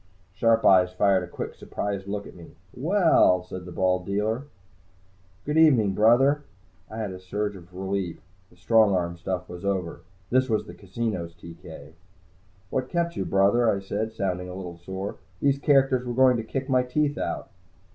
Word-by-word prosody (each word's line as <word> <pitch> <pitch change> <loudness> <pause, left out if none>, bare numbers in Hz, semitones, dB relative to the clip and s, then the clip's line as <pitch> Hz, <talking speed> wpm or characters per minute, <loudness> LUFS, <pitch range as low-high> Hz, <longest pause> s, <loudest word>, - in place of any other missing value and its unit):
Sharp 115 +2 +2
eyes 90 -1 +6
fired 95 +1 +2
a - - -7
quick, - - -6
surprised 100 -1 -5
look 100 0 -4
at - - -11
me. 85 -2 -14 0.2
"Well," 160 - +3
said 90 0 -8
the 90 - -9
bald 90 +1 +1
dealer. 110 +6 -1 1.0
"Good 150 +2 +1
evening, 120 -11 +5
Brother." 130 +8 +4 0.5
I 110 - -8
had 105 -3 -3
a 95 - -8
surge 105 +3 -3
of 90 -1 -14
relief. 95 -1 -3 0.3
The - - -22
strong 110 +2 +4
arm 85 -1 -1
stuff 90 +1 -4
was 90 +1 -9
over. 95 -4 -2 0.3
This 130 +1 +2
was 110 -1 0
the 85 - -10
casino's 95 -2 -4
TK. 85 -3 -12 0.8
"What 130 -1 -2
kept 170 -1 -1
you, 95 - -2
Brother?" 100 +6 +3
I 100 - +1
said, 105 +3 -3
sounding 90 -4 -3
a 90 - -7
little 90 -3 -8
sore. 95 +3 -6 0.2
"These 140 -1 +2
characters 135 -3 +3
were 120 -1 -4
going 130 -1 +5
to 115 - -3
kick 135 +4 -4
my 130 -2 +3
teeth 145 +4 -1
out." - - -4
100 Hz, 175 wpm, -25 LUFS, 90-125 Hz, 1.0 s, eyes